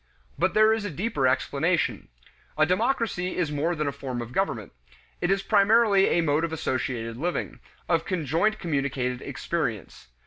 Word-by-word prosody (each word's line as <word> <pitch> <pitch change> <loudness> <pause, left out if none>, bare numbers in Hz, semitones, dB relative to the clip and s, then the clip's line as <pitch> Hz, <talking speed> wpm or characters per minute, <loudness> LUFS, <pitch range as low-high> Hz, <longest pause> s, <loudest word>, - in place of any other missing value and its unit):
But - - 0
there 215 +1 +6
is 220 -1 -2
a 205 - -3
deeper 175 - 0
explanation. 150 +6 0 0.5
A 155 - +5
democracy 200 -1 0
is 170 -4 0
more 155 +4 0
than 150 -1 -2
a 140 - 0
form 135 -3 -5
of 120 0 -6
government; 120 - -2 0.5
it 175 - +1
is 195 0 +1
primarily 200 -1 +4
a 170 - +2
mode 150 0 +1
of 165 - -1
associated 125 -6 -3
living, 175 +6 -3 0.3
of 165 -2 +2
conjoint 175 - 0
communicated 135 -7 -2
experience. - - -4
165 Hz, 160 wpm, -26 LUFS, 140-195 Hz, 0.5 s, there